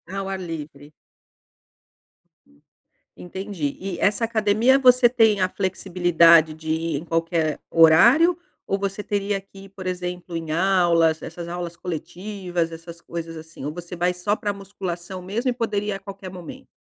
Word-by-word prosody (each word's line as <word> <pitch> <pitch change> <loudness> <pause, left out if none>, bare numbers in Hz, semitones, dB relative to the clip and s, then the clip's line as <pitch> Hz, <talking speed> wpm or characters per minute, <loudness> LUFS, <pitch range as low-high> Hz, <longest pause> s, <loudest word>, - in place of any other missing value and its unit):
Ao 195 0 -3
ar 190 -1 -3
livre. 155 -4 -8 2.3
Entendi. 180 -5 -5
E 190 -2 -5
essa 205 +3 +1
academia, 225 +3 +3
você 250 -2 +6
tem 220 -5 +3
a 185 - +2
flexibilidade 175 -4 +3
de 160 0 -9
ir 160 -1 -1
em 155 - -6
qualquer 165 -2 -1
horário 235 - +6 0.3
ou 195 - 0
você 200 +1 -3
teria 200 -1 -1
que 195 0 -15
ir, - - -15
por 190 -1 -8
exemplo, 180 -1 -4
em 160 -1 -5
aulas? 170 -2 +3
Essas 170 +1 -7
aulas 175 0 -5
coletivas, 180 0 -4
essas 165 +1 -10
coisas, 165 -1 -6
assim, 160 -3 -10
ou 150 - -3
você 175 +1 -8
vai 180 +1 +1
só 190 +4 -1
pra 205 -1 -3
musculação 190 -2 -6
mesmo 225 +8 -2
e - - +1
poderia 210 -4 -2
ir - - -4
a - - -16
qualquer 195 -1 -9
momento? 180 -3 -10
180 Hz, 155 wpm, -23 LUFS, 165-200 Hz, 2.3 s, você